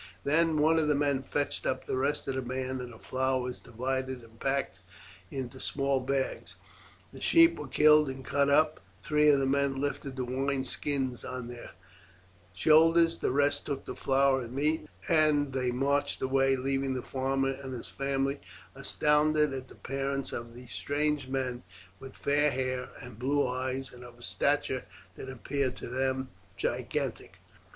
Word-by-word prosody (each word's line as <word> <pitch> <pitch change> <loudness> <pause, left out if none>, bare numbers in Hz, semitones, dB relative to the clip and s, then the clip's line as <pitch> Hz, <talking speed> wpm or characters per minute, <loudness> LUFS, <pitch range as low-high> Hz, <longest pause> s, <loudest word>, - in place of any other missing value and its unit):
Then 160 +2 +3
one 160 +2 +4
of 155 - +1
the 150 - +3
men 140 -2 +1
fetched 145 +2 -2
up 130 - -1
the - - -2
rest 140 +3 0
of 135 - -1
the 130 - -2
band; 130 +1 -3
the 120 -2 -8
flour 130 +2 0
was 125 0 -4
divided 130 +1 -3
and 115 0 -18
packed 135 0 -1 0.5
in 135 -2 -4
the 130 +1 -13
small 140 -1 0
bags; 135 +1 -2 0.6
the - - -11
sheep 335 0 +5
were - - -6
killed 150 -1 +5
and 130 0 -7
cut 140 0 +2
up; 155 +2 +3 0.2
three 150 0 +4
of 140 -2 +5
the 135 - +1
men 135 0 +1
lifted 140 -1 -3
the 130 -1 -2
wine 135 +2 -1
skins 130 -2 -2
on 125 -1 -5
to - - -6
their 120 - -10 0.8
shoulders; 165 - +5
the - - 0
rest 145 +2 +1
took 140 -2 -3
the - - -6
flour 135 0 +2
and 120 0 -7
meat, 150 +4 0 0.2
and 150 -4 +3
they 130 -2 0
marched 140 +3 0
away, 135 0 +3
leaving 135 0 -1
the 125 - -3
farmer 135 0 0
and 135 -1 -6
his 120 - -7
family 135 0 -1 0.3
astounded 150 0 +2
at 130 -1 -5
the - - -15
appearance 135 0 -3
of 115 0 -6
these 125 0 -11
strange 145 -1 0
men 130 -2 -2 0.4
with 135 0 -10
fair 145 +1 +2
hair 130 -1 -2
and 125 -3 -11
blue 140 +2 +1
eyes, 130 +1 -3
and 125 0 -11
of 120 0 -10
stature - - 0 0.3
that 130 - -8
appeared 130 +1 -2
to - - -7
them 130 +1 -1 0.3
gigantic. - - -3
135 Hz, 175 wpm, -30 LUFS, 130-145 Hz, 0.8 s, sheep